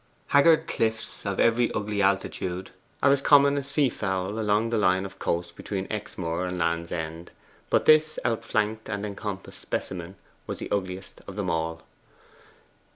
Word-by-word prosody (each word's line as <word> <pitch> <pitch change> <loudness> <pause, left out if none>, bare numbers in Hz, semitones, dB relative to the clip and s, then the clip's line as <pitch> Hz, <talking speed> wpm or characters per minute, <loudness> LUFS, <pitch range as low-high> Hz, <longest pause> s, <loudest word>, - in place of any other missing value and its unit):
Haggard 160 +3 +5
cliffs, 110 -2 -2
of 100 - -2
every 115 +1 +3
ugly 105 -1 -1
altitude, 95 -1 -1 0.3
are 140 - +6
as 140 -1 +3
common 140 0 +6
as 140 -1 -2
sea 140 0 +2
fowl 95 -2 -2
along 110 +1 +1
the 115 - +2
line 95 -1 +3
of 95 -1 -10
coast 85 0 -2
between 95 -2 -4
Exmoor 90 -4 -3
and 90 0 -3
Land's 85 0 -1
End; 80 0 -4 0.4
but - - +2
this 155 0 +5
outflanked 110 -2 -1
and 100 -1 -2
encompassed 100 -1 -6
specimen 90 0 -4 0.3
was - - -4
the - - -7
ugliest 95 -1 -3
of 95 - -7
them 100 -4 -1
all. 80 0 -2
100 Hz, 155 wpm, -26 LUFS, 90-115 Hz, 0.4 s, are